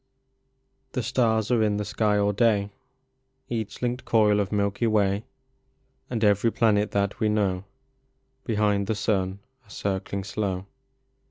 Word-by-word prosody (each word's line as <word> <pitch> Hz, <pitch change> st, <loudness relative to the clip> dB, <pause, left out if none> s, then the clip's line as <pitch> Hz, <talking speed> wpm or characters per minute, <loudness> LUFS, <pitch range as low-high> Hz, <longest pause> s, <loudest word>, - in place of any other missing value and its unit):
HE 125 Hz, -, 0 dB
stars 110 Hz, -2 st, +1 dB
are 120 Hz, -2 st, +3 dB
in 105 Hz, -1 st, +2 dB
the 105 Hz, -, -2 dB
sky 105 Hz, 0 st, +1 dB
all 100 Hz, 0 st, +2 dB
day; 105 Hz, -2 st, +2 dB, 0.8 s
Each 115 Hz, 0 st, -4 dB
linked 125 Hz, +1 st, -1 dB
coil 105 Hz, -2 st, +3 dB
of 100 Hz, -2 st, -1 dB
Milky 100 Hz, +2 st, 0 dB
Way, 105 Hz, 0 st, +1 dB, 0.8 s
And 115 Hz, -3 st, -2 dB
every 105 Hz, +2 st, +3 dB
planet 105 Hz, -3 st, +2 dB
that 100 Hz, 0 st, -1 dB
we 110 Hz, -, +2 dB
know, 100 Hz, -3 st, 0 dB, 0.8 s
Behind 105 Hz, -3 st, +1 dB
the 110 Hz, -, 0 dB
sun 95 Hz, -3 st, 0 dB, 0.3 s
are 105 Hz, -, -26 dB
circling 100 Hz, 0 st, -3 dB
slow. 100 Hz, -2 st, -3 dB
105 Hz, 140 wpm, -26 LUFS, 100-110 Hz, 0.8 s, are